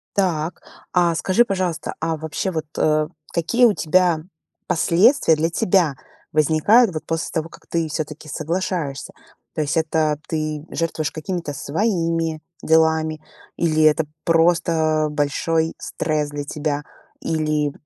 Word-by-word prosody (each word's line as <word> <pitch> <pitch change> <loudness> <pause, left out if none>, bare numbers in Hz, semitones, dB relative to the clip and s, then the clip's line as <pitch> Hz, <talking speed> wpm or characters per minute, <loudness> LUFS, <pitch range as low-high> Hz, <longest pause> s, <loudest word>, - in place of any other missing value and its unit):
Так, 175 -4 -1 0.3
а 175 -2 +3
скажи, 190 +8 +3
пожалуйста, 185 -6 -2
а 160 0 -1
вообще 160 +4 -3
вот, 160 -1 -3
э, 155 0 +2 0.2
какие 235 +9 +2
у 230 - +6
тебя 175 0 +2 0.5
последствия, 175 - +4
для 160 +2 0
тебя 175 -3 +2 0.4
возникают, 160 - +4
вот, 155 - -4
после 165 0 -2
того, 160 -1 -2
как - - -16
ты 165 -1 -1
всё-таки 155 0 -5
соглашаешься? 160 -2 -3 0.4
То 155 - 0
есть 150 +2 -1
это 160 -1 +1
ты 155 -1 -3
жертвуешь 160 -2 -2
какими-то 165 -2 -4
своими 165 - -1 0.2
делами 160 -1 +2 0.4
или 155 -2 +1
это 155 +1 +4 0.2
просто 165 -2 +2
большой 160 +2 0
стресс 150 -2 -2
для 145 0 -5
тебя, 145 0 -3 0.4
или 155 -2 0
160 Hz, 130 wpm, -21 LUFS, 155-170 Hz, 0.5 s, у